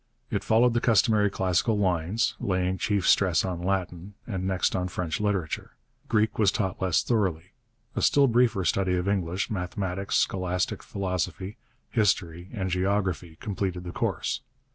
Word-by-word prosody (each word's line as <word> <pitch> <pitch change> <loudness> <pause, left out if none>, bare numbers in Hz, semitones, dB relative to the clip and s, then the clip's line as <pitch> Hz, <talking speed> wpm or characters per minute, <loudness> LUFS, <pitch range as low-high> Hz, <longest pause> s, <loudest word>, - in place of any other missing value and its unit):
It - - -1
followed 115 +2 +4
the 120 - +1
customary 110 -2 +4
classical 95 +3 +1
lines, 95 +3 +1
laying 95 -1 0
chief 100 -3 0
stress 90 -4 +4
on 90 -2 -3
Latin, 95 0 -2
and 95 -4 -3
next 95 -1 +1
on 90 0 -1
French 85 -3 -3
literature. 100 -6 -2 0.4
Greek 110 0 +1
was 100 -3 +5
taught 95 -5 -2
less 95 -3 +2
thoroughly; 90 -7 -1 0.4
a - - -1
still 140 -1 +5
briefer 120 -6 +2
study 95 +1 +1
of 90 +1 -1
English, 95 +1 -1
mathematics, 95 0 -3
scholastic 90 -1 0
philosophy, 95 0 -3 0.3
history, 90 -6 0
and 95 -5 -3
geography 90 -3 -1
completed 95 -3 -3
the 90 - -6
course. 120 - -2
95 Hz, 145 wpm, -27 LUFS, 90-105 Hz, 0.4 s, was